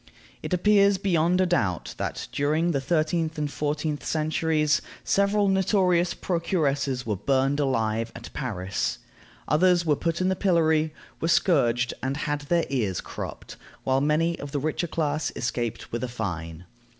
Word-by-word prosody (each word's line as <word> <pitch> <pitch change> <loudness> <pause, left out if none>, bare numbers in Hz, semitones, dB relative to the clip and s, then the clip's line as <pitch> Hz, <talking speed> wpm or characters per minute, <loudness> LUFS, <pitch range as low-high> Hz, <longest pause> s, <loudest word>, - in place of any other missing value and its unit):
It - - -6
appears 200 +2 +4
beyond 180 -2 +2
a - - +4
doubt 115 - 0
that, - - -3
during 155 +4 +1
the 140 -4 0
thirteenth 160 +2 0
and 150 -1 -2
fourteenth 150 0 -2
centuries, 155 -1 +1 0.2
several 200 +1 +2
notorious 185 -2 +2
procuresses 145 -7 -1
were 105 -2 -1
burned 135 +7 +1
alive 115 -4 0
at 115 - -10
Paris. 100 - -2 0.5
Others 175 +1 +3
were 150 -2 +3
put 165 +2 -2
in 185 - +1
the 190 - +1
pillory; 160 -4 +2 0.3
were 165 - -1
scourged, 125 -9 +2
and 135 +1 -2
had 150 -1 -2
their 170 -1 +3
ears 105 -9 0
cropped; - - -7 0.3
while 135 0 +2
many 160 +3 +1
of 145 - -7
the 145 - 0
richer 155 +4 -1
class 155 -2 -1
escaped 120 -2 -3
with 120 +2 -3
a - - -1
fine. 90 -7 -5
150 Hz, 150 wpm, -26 LUFS, 130-170 Hz, 0.5 s, appears